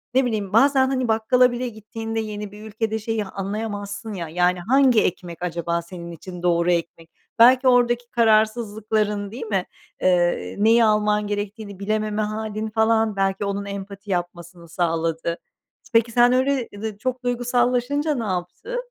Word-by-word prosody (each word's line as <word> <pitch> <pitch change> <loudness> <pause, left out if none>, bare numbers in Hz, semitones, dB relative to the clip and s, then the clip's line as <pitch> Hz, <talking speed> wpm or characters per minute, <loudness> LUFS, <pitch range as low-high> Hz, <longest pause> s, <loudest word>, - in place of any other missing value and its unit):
ne 265 - +4
bileyim... 210 -4 -2
Bazen 265 +2 +5
hani 255 -2 -1
bakkala 235 +3 +3
bile 245 +1 -3
gittiğinde 225 +1 -5
yeni 210 -2 -5
bir 210 +1 -12
ülkede 220 +1 -2
şeyi 220 -1 -2
anlayamazsın 205 +1 -5
ya, 170 -4 -5
yani 180 +2 +1
hangi 255 +3 +4
ekmek 175 -1 -4
acaba 170 -1 -2
senin 170 0 -9
için 180 +1 -9
doğru 175 0 +2
ekmek? 165 -1 -3 0.3
Belki 255 +2 +7
oradaki 245 -1 +3
kararsızlıkların, 215 -2 +1
değil 240 0 -6
mi? 195 -4 -1 0.4
Eee, 175 -1 +1
neyi 225 +2 +5
alman 210 -1 +2
gerektiğini 205 -1 -5
bilememe 215 +1 -1
hâlin 215 0 -3
falan 220 -1 +2
belki 195 +1 0
onun 200 0 -3
empati 200 0 -7
yapmasını 175 -1 -5
sağladı. 165 0 -1 0.6
Peki, 230 0 +3
sen 245 +1 +5
öyle, 260 -1 +1
ııı, 205 - -10
de 215 -2 -4
çok 255 +3 -3
duygusallaşınca 245 +4 0
ne 235 - -2
yaptı? 190 - -4
215 Hz, 150 wpm, -23 LUFS, 190-235 Hz, 0.6 s, Belki